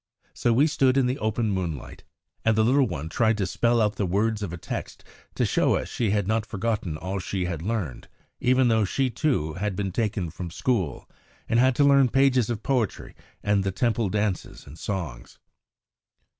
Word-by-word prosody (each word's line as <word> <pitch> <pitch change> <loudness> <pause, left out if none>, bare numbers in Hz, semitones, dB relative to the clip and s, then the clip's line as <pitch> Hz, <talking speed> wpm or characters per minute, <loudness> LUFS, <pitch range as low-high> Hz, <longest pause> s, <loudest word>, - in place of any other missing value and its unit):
So 120 - +1
we 130 +6 +4
stood 135 -4 +2
in 135 - +4
the 125 +2 -1
open 110 0 0
moonlight, 85 -8 -4 0.4
and 110 -1 +3
the 110 - +3
little 135 +2 +4
one 80 -5 -5
tried 110 +6 +1
to 100 - 0
spell 120 +6 +1
out 105 -2 +1
the 100 - 0
words 105 +4 0
of 100 -5 -3
a 85 - -5
text - - -6 0.3
to - - +1
show - - +2
us - - -3
she 115 -4 -1
had 100 -2 0
not 110 +1 +1
forgotten 105 -6 -2
all 95 +4 -4
she 95 0 -2
had 85 -3 -3
learned, 95 - -3 0.3
even 130 0 +3
though 110 -2 +3
she, 125 +7 0
too, 115 - 0
had 100 +2 -2
been 95 0 -2
taken 100 -5 -1
from 90 +1 -6
school, 90 - -1 0.4
and 115 +1 +2
had 130 0 +4
to 145 - +3
learn 140 -2 +5
pages 130 -3 +3
of 115 -3 -3
poetry 125 -6 -1 0.3
and 105 -1 +2
the 95 - -1
Temple 115 0 0
dances 105 -2 -2
and 75 +3 -12
songs. 85 -12 -5
105 Hz, 195 wpm, -25 LUFS, 95-120 Hz, 0.4 s, learn